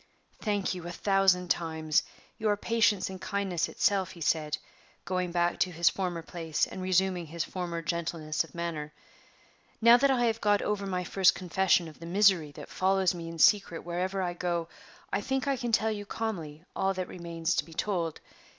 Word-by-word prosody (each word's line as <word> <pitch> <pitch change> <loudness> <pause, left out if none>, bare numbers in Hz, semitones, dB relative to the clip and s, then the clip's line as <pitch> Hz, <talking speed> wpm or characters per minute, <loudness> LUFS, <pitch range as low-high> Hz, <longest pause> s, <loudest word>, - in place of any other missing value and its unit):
"Thank 205 -3 0
you 175 -2 -7
a - - -4
thousand 190 -1 +2
times. 160 -2 +1 0.4
You 215 -1 +1
are 205 - +2
patience 220 -3 +2
and 190 -1 -8
kindness 195 -4 -1
itself," 195 -3 +1
he 170 - -13
said, 155 -1 +1 0.5
going 185 -1 -1
back 175 0 +1
to 185 - +2
his 170 0 +3
former 175 -3 -3
place 165 -3 -1
and 190 - -8
resuming 185 -2 +1
his 170 +2 -3
former 170 -2 -4
gentleness 160 -1 -1
of 165 - -16
manner. 160 -3 -4 0.9
"Now 235 +1 +8
that 275 +3 +3
I 250 -3 +3
have 225 -1 0
got 205 -1 +3
over 200 -1 -1
my 180 -1 -1
first 185 +1 +4
confession 180 -1 +2
of 155 - -13
the 165 - -8
misery 185 -5 +4
that - - -9
follows 190 -1 +2
me 170 -1 -6
in 165 - -8
secret 185 -1 +4
wherever 185 +2 -2
I 175 -1 -1
go, 170 -1 -2 0.4
I - - +1
think 265 +1 -1
I 275 - +2
can 240 -2 -3
tell 220 0 +3
you 205 -1 -5
calmly 170 -9 -4
all 195 0 +1
that 185 -1 -3
remains 170 -1 -3
to - - +1
be 165 - -14
told. 175 -5 -2
180 Hz, 190 wpm, -29 LUFS, 170-200 Hz, 0.9 s, Now